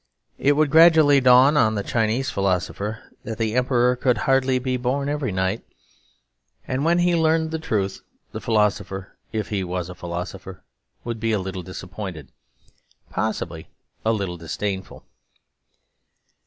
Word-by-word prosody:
It 145 - +4
would 150 -1 +2
gradually 160 -3 +7
dawn 130 +3 +6
on 110 -6 +3
the 100 - -2
Chinese 115 +4 0
philosopher 100 +3 -2 0.2
that 110 -2 -5
the 110 -1 -1
Emperor 125 0 +2
could 125 0 +1
hardly 135 -1 +2
be 130 0 -1
born 130 +3 -1
every 145 -5 -1
night. 95 +3 -1 1.0
And 130 +2 -1
when 170 +2 +3
he 175 0 +3
learnt 160 -1 +2
the 160 - -2
truth 100 -10 -2 0.3
the - - -6
philosopher, 105 -3 -1 0.2
if 110 -1 -3
he 100 -3 -1
was 90 -1 -4
a - - -6
philosopher, 90 +1 -7 0.4
would 115 -1 -4
be 115 0 0
a - - +2
little 95 0 -5
disappointed... 90 -4 -8 0.8
possibly 85 -7 -3 0.4
a 110 - +2
little 100 -5 -2
disdainful. 95 +4 -5
110 Hz, 140 wpm, -23 LUFS, 95-135 Hz, 1.0 s, gradually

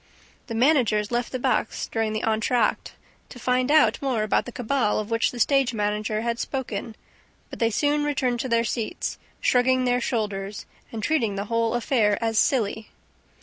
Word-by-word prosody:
The 230 - -5
managers 230 -5 +2
left 240 0 -1
the 255 - -2
box 245 - -1
during 225 -1 -2
the 215 - -3
entr'acte 220 +1 0 0.4
to - - -11
find 250 +1 0
out 305 0 +4
more 255 -6 0
about 215 - +1
the 245 - -7
cabal 245 -2 0
of 215 +1 -4
which 230 0 +2
the 245 - -8
stage 270 -1 +2
manager 210 +1 -1
had 235 0 -2
spoken; 235 -4 -4 0.6
but - - -8
they 230 - +3
soon 290 +6 +1
returned 260 -4 0
to 260 - -3
their 230 0 +2
seats, 230 -1 -3 0.2
shrugging 255 +1 +3
their 245 0 +1
shoulders 205 -4 -3 0.3
and 220 -2 -5
treating 230 -8 +1
the 200 +1 -3
whole 230 0 +1
affair 225 -4 +2
as 225 -1 +1
silly. 220 -4 0
230 Hz, 175 wpm, -24 LUFS, 215-255 Hz, 0.6 s, out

